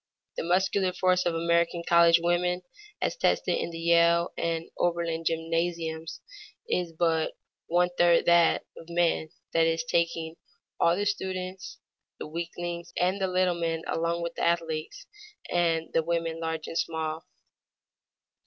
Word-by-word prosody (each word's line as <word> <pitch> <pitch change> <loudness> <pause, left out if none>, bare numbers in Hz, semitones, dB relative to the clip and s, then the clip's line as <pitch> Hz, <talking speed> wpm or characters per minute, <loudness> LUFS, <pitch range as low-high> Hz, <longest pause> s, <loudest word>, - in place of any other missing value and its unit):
The - - -2
muscular 185 +2 +1
force 185 0 +2
of 170 - 0
American 170 +1 +1
college 170 0 +6
women 180 +1 0 0.4
as - - 0
tested - - +1
in - - -2
the 165 - -7
Yale 170 +1 +3
and 165 -1 -2
the - - -22
Oberlin 170 -1 0
gymnasiums 165 0 -2 0.5
is 180 - -1
but 160 -1 0 0.3
one 175 +1 +2
third 175 -1 +5
that 170 -1 +4
of 165 - -12
men, 170 -2 +1 0.2
that 165 0 +4
is, 165 0 0
taking 165 -1 -1 0.4
all 170 0 +4
the 205 +2 -1
students, 190 -2 -4 0.4
the - - -6
weaklings 170 +2 -5
and 185 +2 +1
the 190 - +2
little 185 -1 +2
men 165 -1 -2
along 170 +1 -1
with 170 0 -3
the - - -6
athletes, 165 - -1 0.5
and 165 -2 +1
the 165 - +3
women 165 0 -2
large 160 -1 -3
and 165 - -3
small. 160 -1 -3
170 Hz, 145 wpm, -27 LUFS, 165-175 Hz, 0.5 s, college